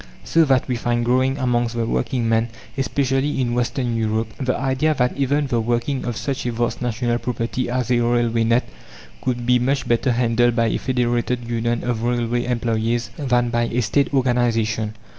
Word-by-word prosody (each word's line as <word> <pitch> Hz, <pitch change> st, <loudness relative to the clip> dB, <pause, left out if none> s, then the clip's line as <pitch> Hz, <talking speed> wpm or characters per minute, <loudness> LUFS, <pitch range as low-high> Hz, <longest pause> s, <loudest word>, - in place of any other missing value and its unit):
So 165 Hz, -, +3 dB
that 135 Hz, -2 st, +2 dB
we 125 Hz, -2 st, -1 dB
find 120 Hz, 0 st, 0 dB
growing 130 Hz, +2 st, +2 dB
amongst 120 Hz, -3 st, 0 dB
the 115 Hz, -1 st, 0 dB
working 120 Hz, +1 st, -1 dB
men, 115 Hz, +1 st, +2 dB, 0.3 s
especially 135 Hz, +1 st, 0 dB
in 120 Hz, -2 st, 0 dB
Western 120 Hz, 0 st, -1 dB
Europe, 110 Hz, 0 st, -1 dB
the 130 Hz, -2 st, 0 dB
idea 135 Hz, +4 st, +1 dB
that 125 Hz, -2 st, +1 dB
even 140 Hz, +2 st, +1 dB
the 120 Hz, -4 st, 0 dB
working 120 Hz, +4 st, -1 dB
of 120 Hz, -3 st, -3 dB
such 140 Hz, -2 st, -3 dB
a -, -, 0 dB
vast 120 Hz, +1 st, -2 dB
national 120 Hz, 0 st, -1 dB
property 125 Hz, +1 st, -2 dB
as 125 Hz, 0 st, -1 dB
a 120 Hz, -, +3 dB
railway 120 Hz, -1 st, +1 dB
net 115 Hz, +2 st, +2 dB, 0.6 s
could 120 Hz, -1 st, -1 dB
be 125 Hz, 0 st, +4 dB
much 135 Hz, +3 st, 0 dB
better 120 Hz, +2 st, +2 dB
handled 120 Hz, 0 st, +2 dB
by 115 Hz, -1 st, +2 dB
a -, -, 0 dB
Federated 120 Hz, -1 st, -1 dB
Union 120 Hz, 0 st, -1 dB
of 120 Hz, -2 st, -1 dB
railway 120 Hz, 0 st, 0 dB
employés, 115 Hz, -1 st, 0 dB
than 120 Hz, -4 st, +1 dB
by 120 Hz, 0 st, +1 dB
a 120 Hz, +1 st, -1 dB
State 135 Hz, +7 st, +1 dB
organization. 115 Hz, -5 st, +1 dB
120 Hz, 180 wpm, -21 LUFS, 115-130 Hz, 0.6 s, be